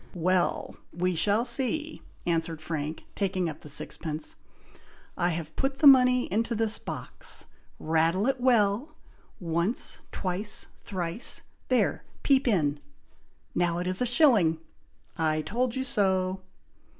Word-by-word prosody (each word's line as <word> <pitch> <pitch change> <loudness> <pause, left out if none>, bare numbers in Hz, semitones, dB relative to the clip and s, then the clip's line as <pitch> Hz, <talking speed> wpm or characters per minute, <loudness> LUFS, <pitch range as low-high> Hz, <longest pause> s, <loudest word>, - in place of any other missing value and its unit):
"Well! 180 +1 0
we 180 +2 -1
shall 205 +7 +2
see!" 275 +6 0 0.2
answered 165 -2 -1
Frank, 155 -1 -4
taking 190 -3 -1
up 155 - -6
the 150 - -11
sixpence. 155 +1 -3 0.8
"I 175 - +1
have 160 -2 -5
put 270 0 -1
the 295 - +1
money 250 -2 +7
into 230 +2 0
this 225 0 +1
box! - - -5 0.3
rattle 165 +5 +1
it 265 -1 0
well! 240 +4 +2 0.4
once! 170 +5 +1
twice! 190 +3 0
thrice! 180 +2 -1 0.2
there, 255 -1 +1 0.2
peep 270 -2 +3
in! 150 -10 +1 0.7
now 175 -1 0
it 175 - -3
is 185 +3 0
a 250 - +2
shilling! 230 - +4 0.6
I 155 -1 +1
told 240 +5 -1
you 260 - -1
so!" 190 -5 0
190 Hz, 125 wpm, -27 LUFS, 165-245 Hz, 0.8 s, money